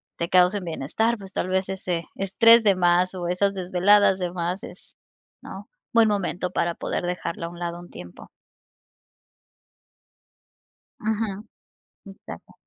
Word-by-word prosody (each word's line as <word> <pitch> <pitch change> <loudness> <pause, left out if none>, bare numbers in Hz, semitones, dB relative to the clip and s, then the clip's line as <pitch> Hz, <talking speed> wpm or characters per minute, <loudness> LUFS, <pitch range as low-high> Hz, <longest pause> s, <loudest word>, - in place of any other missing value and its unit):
te 170 - -4
causen 185 +2 +3
bienestar, 180 +9 -1
pues 195 -2 -12
tal 185 - -2
vez, 185 0 0
ese 180 -3 -4
estrés 230 +4 +5
de 200 -3 +4
más 180 +1 +2
o 180 -2 -5
esas 195 +3 0
desveladas 190 +2 +3
de 180 -1 -3
más 175 +2 -4
es, - - -12 0.5
¿no?, - - -10 0.2
buen 230 -1 +4
momento 190 -3 -2
para 170 -1 -1
poder - - -4
dejarlo 175 -1 -4
a - - -7
un 175 0 -12
lado 170 -1 -4
un 175 - -13
tiempo. 90 0 -12 2.7
Ujú. 215 -2 -2 0.6
Exacto. 195 0 -12
185 Hz, 135 wpm, -24 LUFS, 175-200 Hz, 2.7 s, estrés